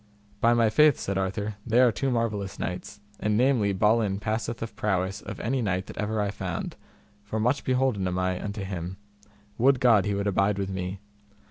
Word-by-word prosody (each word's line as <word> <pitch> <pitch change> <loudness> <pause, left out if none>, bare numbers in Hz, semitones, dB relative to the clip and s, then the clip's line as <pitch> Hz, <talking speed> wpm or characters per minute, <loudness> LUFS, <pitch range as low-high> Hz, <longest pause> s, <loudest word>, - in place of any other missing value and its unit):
By 120 +2 +4
my 115 -2 +3
faith, 150 +1 +5
said 100 0 -2
Arthur, 100 +2 -2
they 115 +2 +2
are 125 -2 +6
two 135 +5 -1
marvellous 110 -5 -1
knights, 90 +2 -5 0.2
and 105 0 +1
namely 120 -5 +3
Balin 105 0 +2
passeth 110 +2 -2
of 110 -2 -7
prowess 100 -2 -1
of - - -7
any 130 +3 -1
knight 95 -4 -1
that - - -11
ever 110 +1 -1
I 100 -1 0
found, 95 -4 -4 0.5
for 105 +2 -3
much 125 +6 +1
beholden 125 -7 +1
am 90 0 -2
I 90 0 -1
unto 100 -1 -4
him; 95 -1 -5 0.6
would 135 +2 +4
God 115 -6 +5
he 105 -1 0
would 100 0 -2
abide 100 0 +2
with 95 -1 -2
me. 95 +1 -4
105 Hz, 195 wpm, -27 LUFS, 95-115 Hz, 0.6 s, are